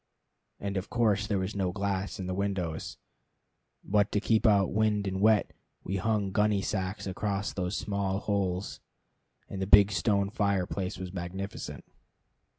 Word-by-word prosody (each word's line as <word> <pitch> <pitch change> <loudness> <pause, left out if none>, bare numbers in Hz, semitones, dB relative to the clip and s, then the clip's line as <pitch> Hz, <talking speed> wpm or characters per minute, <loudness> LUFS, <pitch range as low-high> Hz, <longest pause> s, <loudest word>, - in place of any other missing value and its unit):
And 100 0 -3
of 95 - -4
course 110 -4 +2
there 105 - 0
was 95 +2 -2
no 95 -2 0
glass 100 0 -2
in 95 - -3
the 90 - -2
windows; 95 -5 -2 0.9
but 105 0 +2
to 105 - +3
keep 110 +1 +2
out 100 -3 +4
wind 105 -1 +2
and 95 0 -2
wet 110 -1 +4 0.3
we 95 - -2
hung 105 -1 0
gunny 105 0 +2
sacks 95 +1 -2
across 100 +1 -2
those 90 +1 -2
small 100 -2 -1
holes, 100 -2 -2 0.7
and 95 - -6
the 95 - -1
big 100 0 +7
stone 100 +2 +1
fireplace 100 -2 -1
was 90 0 -6
magnificent. 90 -4 -6
100 Hz, 155 wpm, -29 LUFS, 95-105 Hz, 0.9 s, big